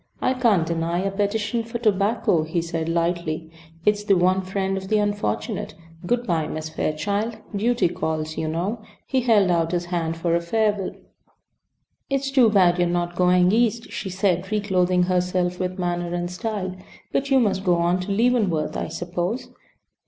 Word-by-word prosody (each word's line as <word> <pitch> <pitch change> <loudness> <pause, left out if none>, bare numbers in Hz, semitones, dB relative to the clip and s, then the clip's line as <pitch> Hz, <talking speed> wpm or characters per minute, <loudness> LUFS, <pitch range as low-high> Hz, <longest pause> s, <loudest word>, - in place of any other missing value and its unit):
"I 255 - +1
can't 230 -10 +3
deny 170 +1 -1
a 195 +1 -1
petition 210 +3 -1
for 230 +1 -5
tobacco," 200 -5 +2
he 160 +3 -1
said, 165 -1 -3
lightly. 165 -1 -1 0.3
"It's 210 0 +2
the 200 -2 +3
one 185 +2 +3
friend 190 +1 -2
of 190 0 -5
the 215 +2 +2
unfortunate. 205 0 -2 0.3
Good 245 +2 +1
bye, 165 -6 0
Miss 155 0 -5
Fairchild. 200 +9 -2 0.2
Duty 235 +1 +2
calls, 160 -3 -3
you 160 - -2
know." 180 +8 -2 0.2
He 260 - 0
held 210 -6 +4
out 165 0 +1
his 175 0 0
hand 165 -1 -1
for 170 0 +1
a 170 - +1
farewell. 205 +2 0 1.1
"It's 275 0 -1
too 255 -4 +5
bad 180 -4 +4
you 175 - +4
are - - -1
not 175 0 -1
going 180 0 +4
East," 230 +1 +1
she 195 - -4
said, 185 0 0
reclothing 185 -4 +2
herself 180 0 0
with 185 0 -2
manner 175 -1 -2
and 175 0 -3
style. 190 -1 -3 0.4
"But 275 +1 0
you 270 -1 +5
must 200 -5 +1
go 180 -3 +3
on 170 +2 +1
to 185 +2 -4
Leavenworth, 205 -8 +1
I - - -2
suppose?" 175 +6 -3
185 Hz, 175 wpm, -23 LUFS, 175-210 Hz, 1.1 s, too